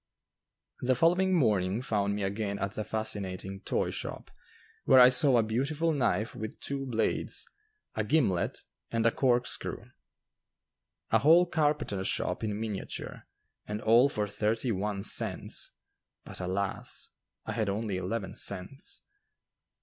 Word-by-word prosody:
The 130 +1 +2
following 180 +6 +3
morning 105 - +1
found 100 -3 0
me 105 - -2
again 100 +1 -2
at 100 +1 -3
the 110 - -3
fascinating 95 -3 -3
toy - - -1
shop, - - -6 0.5
where 130 - +7
I 125 0 +9
saw 130 0 +5
a 115 - +4
beautiful 140 +9 0
knife 120 -5 0
with 110 0 -7
two 135 -1 -4
blades, 115 -3 0 0.5
a 110 - -1
gimlet, 105 - +1 0.3
and 115 0 0
a 115 - +5
corkscrew, 125 -1 0 1.2
a - - +5
whole 165 +5 +6
carpenter 150 - 0
shop - - -1
in 105 -1 -2
miniature, 110 -3 -5 0.4
and 105 0 -3
all 115 +5 +5
for 105 -6 0
thirty 110 +4 -1
one 100 0 -2
cents. - - -1 0.5
But, - - -7
alas! 95 +2 -3 0.4
I - - -3
had 110 -2 -1
only 100 -1 -2
eleven 95 +2 -3
cents. 100 +8 -2
110 Hz, 135 wpm, -30 LUFS, 100-130 Hz, 1.2 s, I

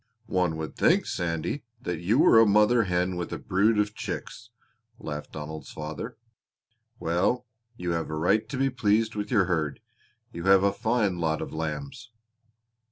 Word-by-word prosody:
"One 90 -6 0
would 80 -3 -5
think, - - +3
Sandy, 85 - -2 0.2
that 90 -9 -4
you 100 +8 +1
were 115 - +7
a 115 - +6
mother 105 +3 +4
hen 90 0 0
with 85 - -4
a - - -3
brood 105 +4 +2
of 105 0 +1
chicks!" - - -6 0.5
laughed 75 0 -6
Donald's 75 +1 -7
father. 80 +10 -6 0.8
"Well, 95 +9 0 0.3
you 90 -1 -2
have 85 -1 -2
a 80 - -3
right 90 +7 +1
to 135 - -4
be 135 +1 +1
pleased 110 -1 +1
with 105 -1 -4
your 105 -7 +3
herd. 80 -5 -1 0.5
You 85 +1 -6
have 95 0 +6
a 100 0 +3
fine 110 -5 0
lot 80 -1 0
of - - -6
lambs." 110 - -5
95 Hz, 165 wpm, -27 LUFS, 80-110 Hz, 0.8 s, were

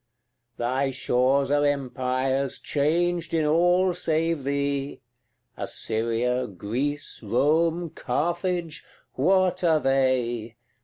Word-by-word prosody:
CLXXXII. 120 +1 -52
Thy 130 +3 0
shores 130 +1 +1
are 145 0 +3
empires, 135 -1 -1
changed 170 +3 0
in 160 -1 +2
all 175 +4 +3
save 165 -2 0
thee 140 0 -2 0.6
Assyria, 115 +2 -1
Greece, 125 +10 -4
Rome, 160 - +1
Carthage, 170 +3 -2 0.3
what 185 +5 +2
are 160 -3 +4
they? 125 -4 0
140 Hz, 95 wpm, -25 LUFS, 125-165 Hz, 0.6 s, are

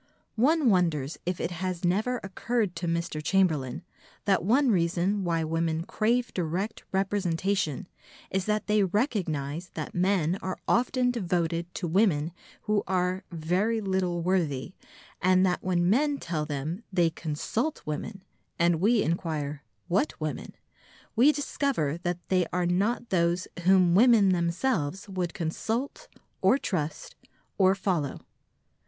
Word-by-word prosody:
One 285 0 +4
wonders 165 -6 +1
if 180 -1 -1
it 170 - -2
has 180 0 -3
never 220 +8 +1
occurred 200 0 -1
to 175 - -3
Mr. 165 -2 -2
Chamberlain 160 -5 +1 0.4
that 195 -4 +2
one 250 +6 +3
reason 180 +2 +1
why 165 -2 0
women 165 0 -1
crave 235 +6 0
direct 185 +5 -2
representation 190 -3 0 0.4
is 190 -1 0
that 210 0 0
they 210 -1 +3
recognise 175 - -1
that 155 - -5
men 180 -1 +1
are 185 -1 -3
often 250 +1 +2
devoted 170 -6 -1
to 175 - -2
women 165 -4 +2 0.3
who 210 -1 +1
are 185 0 0
"very 180 +8 0
little 190 -4 -1
worthy," 170 -5 0 0.5
and 185 0 +4
that 180 -1 0
when 175 -1 +1
men 285 +8 +2
tell 160 - -3
them 155 +8 -4
they 175 -3 +2
"consult 170 - -3
women," 185 +6 -5 0.3
and 170 -1 +2
we 220 +2 +4
inquire 155 -3 -2 0.3
"what 195 - 0
women?" 155 -1 -4 0.6
we 255 +6 +6
discover 275 - -1
that 175 0 -2
they 185 -2 +2
are 180 0 0
not 205 +7 0
those 175 0 +1 0.2
whom 185 -2 +5
women 220 -1 +6
themselves 180 - 0
would 185 -3 -3
consult 225 - -3 0.3
or - - +5
trust 160 - -3 0.4
or 190 0 +5
follow. 180 -8 -1
185 Hz, 135 wpm, -28 LUFS, 165-205 Hz, 0.6 s, we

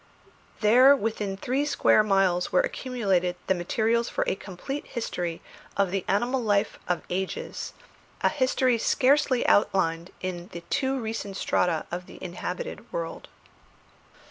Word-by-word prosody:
There 250 +6 +7
within 210 -5 -2
three 260 +7 0
square 290 -6 +4
miles 195 -4 +2
were 180 - +4
accumulated 195 -9 0
the - - +3
materials 220 +6 0
for - - 0
a - - +1
complete 200 +10 -6
history 175 -8 -4 0.3
of 200 -2 +2
the 195 -1 -1
animal 240 +6 +1
life 205 -3 +1
of 180 - -1
ages, 190 +1 -3 0.5
a - - +4
history 255 -4 +2
scarcely 265 +1 +3
outlined 170 -4 +2
in 180 -1 -5
the 170 - -6
too 265 -1 +1
recent 220 -4 -4
strata 170 -4 +1
of 180 +1 -5
the - - -12
inhabited 185 - -6
world. - - -5
205 Hz, 135 wpm, -26 LUFS, 180-255 Hz, 0.5 s, There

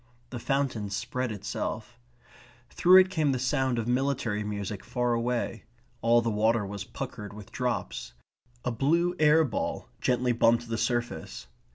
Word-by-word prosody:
The 120 - -5
fountain 130 -6 -1
spread 125 +5 -2
itself. 110 +3 -5 0.7
Through 185 +2 +7
it 185 0 -1
came 155 -6 +1
the - - 0
sound 130 0 0
of 115 -1 -2
military 125 -4 0
music 100 -1 -4
far 125 -1 0
away. 115 -1 -2 0.4
All 120 +1 +4
the 115 - 0
water 110 +1 +2
was 100 0 -5
puckered 105 -2 -7
with 105 -1 -11
drops. 125 - -3 0.5
A 125 - +1
blue 165 +9 +2
air 155 +1 +6
ball 125 -8 -3
gently 125 0 +1
bumped 115 0 +3
the 115 - -1
surface. 120 - -2
120 Hz, 150 wpm, -28 LUFS, 110-130 Hz, 0.7 s, Through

